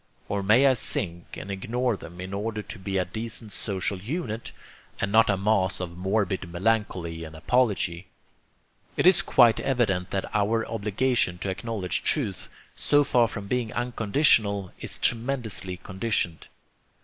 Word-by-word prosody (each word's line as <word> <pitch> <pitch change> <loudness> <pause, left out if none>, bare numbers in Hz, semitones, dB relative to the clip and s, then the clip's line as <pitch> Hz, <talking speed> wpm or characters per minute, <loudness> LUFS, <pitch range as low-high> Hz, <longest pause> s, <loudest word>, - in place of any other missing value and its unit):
or 100 0 -1
may 110 +8 +5
I 135 - +6
sink 85 -7 -2
and 100 - -6
ignore 120 +5 -1
them 85 -1 -11
in 95 +1 -6
order 105 +1 -3
to 110 - -9
be 95 +1 -2
a 90 - +1
decent 110 +2 -6
social 95 -2 -2
unit, 115 - -4 0.5
and 100 - -1
not 115 +1 +5
a 100 - +2
mass 95 -2 +1
of 90 -2 -5
morbid 95 -1 -1
melancholy 90 -4 -1
and 80 0 -9
apology? 95 -2 +1 0.9
It - - +2
is 185 0 +7
quite 120 -10 +5
evident 110 -9 0
that 95 - -2
our 110 +2 +1
obligation 110 -2 0
to 95 - 0
acknowledge 95 0 -3
truth, 110 - +1 0.3
so 145 0 +3
far 120 -4 +3
from 105 -2 -6
being 120 +1 -1
unconditional, 115 -4 +2
is - - -3
tremendously 115 -6 -1
conditioned. 95 -3 -2
105 Hz, 150 wpm, -26 LUFS, 95-115 Hz, 0.9 s, is